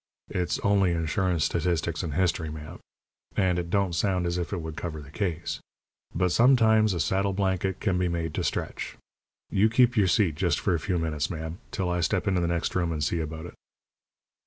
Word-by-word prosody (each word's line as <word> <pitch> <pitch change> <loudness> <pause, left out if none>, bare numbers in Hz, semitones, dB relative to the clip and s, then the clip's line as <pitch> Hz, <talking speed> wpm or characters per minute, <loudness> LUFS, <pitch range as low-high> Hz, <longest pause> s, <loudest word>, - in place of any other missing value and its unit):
It's 90 -1 0
only 100 -3 +3
Insurance, 85 0 0
Statistics, 85 -1 0
and 80 -5 -4
History, 85 -3 +1
ma'am, 75 0 -8 0.6
and 90 -3 +2
it 85 -1 -4
don't 95 -1 +1
sound 90 +1 +1
as 85 +1 -1
if 85 - -4
it 100 - -1
would 80 -2 -5
cover 80 -1 -5
the 70 -1 -11
case. 85 -3 -2 0.6
But 90 +1 +2
sometimes 110 -3 +5
a - - -2
saddle 95 +6 +1
blanket 95 -1 0
can 95 -4 0
be 90 - +1
made 85 -2 -2
to - - -2
stretch. - - -3 0.5
You 105 +3 +4
keep 120 +2 +4
your 105 -4 +4
seat, 90 -1 +3
just 85 0 0
for 95 - +1
a 85 - +1
few 90 +1 -1
minutes, 75 -3 -1
ma'am, 80 +1 -5
till 90 -3 -2
I 90 - 0
step 95 +3 0
into 95 -2 +2
the 85 - +1
next 85 -1 -1
room 85 -2 0
and 75 -2 -2
see 85 +3 0
about 80 +1 -5
it." - - -9
90 Hz, 205 wpm, -27 LUFS, 80-95 Hz, 0.6 s, sometimes